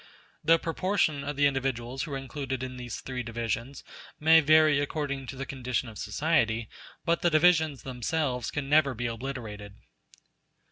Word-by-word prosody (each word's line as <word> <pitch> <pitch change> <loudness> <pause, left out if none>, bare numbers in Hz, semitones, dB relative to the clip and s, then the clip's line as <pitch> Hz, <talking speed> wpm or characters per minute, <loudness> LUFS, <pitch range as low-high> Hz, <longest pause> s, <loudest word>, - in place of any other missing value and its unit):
The 165 +2 +5
proportion 165 -3 0
of 145 +1 -4
the 145 +1 +3
individuals 135 -2 -1
who 145 +1 -4
are - - -1
included 135 -1 -4
in 130 0 -5
these 125 -1 -6
three 130 -1 -4
divisions 115 +2 -4 0.4
may 160 +2 +7
vary 155 -1 +5
according 140 -2 -3
to 135 - -6
the 135 +1 -5
condition 130 -1 -3
of 110 - -10
society, 115 - 0 0.4
but 170 -1 +1
the 175 - +3
divisions 160 -3 +3
themselves 130 0 -2
can 145 -2 -4
never 140 -2 +4
be 120 +2 -3
obliterated. 115 -4 -5
135 Hz, 155 wpm, -28 LUFS, 120-155 Hz, 0.4 s, may